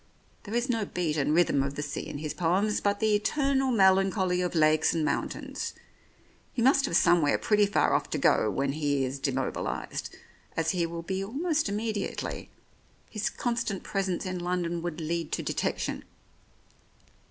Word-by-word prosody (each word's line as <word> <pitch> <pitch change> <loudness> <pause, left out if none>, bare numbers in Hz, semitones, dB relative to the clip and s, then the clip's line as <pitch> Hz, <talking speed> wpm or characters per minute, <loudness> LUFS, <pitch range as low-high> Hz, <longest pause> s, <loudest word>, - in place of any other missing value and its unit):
"There 215 +2 -5
is 240 +1 +1
no 230 -4 0
beat 175 -5 -2
and 150 -1 +1
rhythm 160 -4 +3
of 140 +1 -2
the 145 - -3
sea 145 - -5
in - - -6
his 150 0 -4
poems, 190 +5 +1
but 200 0 +1
the 220 -1 +2
eternal 270 +5 +1
melancholy 190 -3 +3
of 180 -1 -2
lakes 155 +1 +4
and 160 -2 +1
mountains. - - -3 0.8
He 235 - 0
must 270 +2 +5
have - - -1
somewhere 165 -5 +4
pretty 210 -1 +3
far 205 - +2
off - - 0
to - - -1
go - - +3
to - - +1
when 135 +3 0
he 145 -2 0
is 130 +2 -4
demobilized, 135 -1 -3 0.4
as 165 0 +1
he 175 -3 0
will 170 0 -6
be 190 +2 -2
almost 295 - -1
immediately. 210 0 -3 0.6
His 215 -2 -1
constant 235 -5 -2
presence 195 -3 -2
in 185 -1 -3
London 175 -1 -2
would 175 -1 -4
lead 165 0 -2
to - - -1
detection." - - -2
180 Hz, 170 wpm, -28 LUFS, 155-210 Hz, 0.8 s, must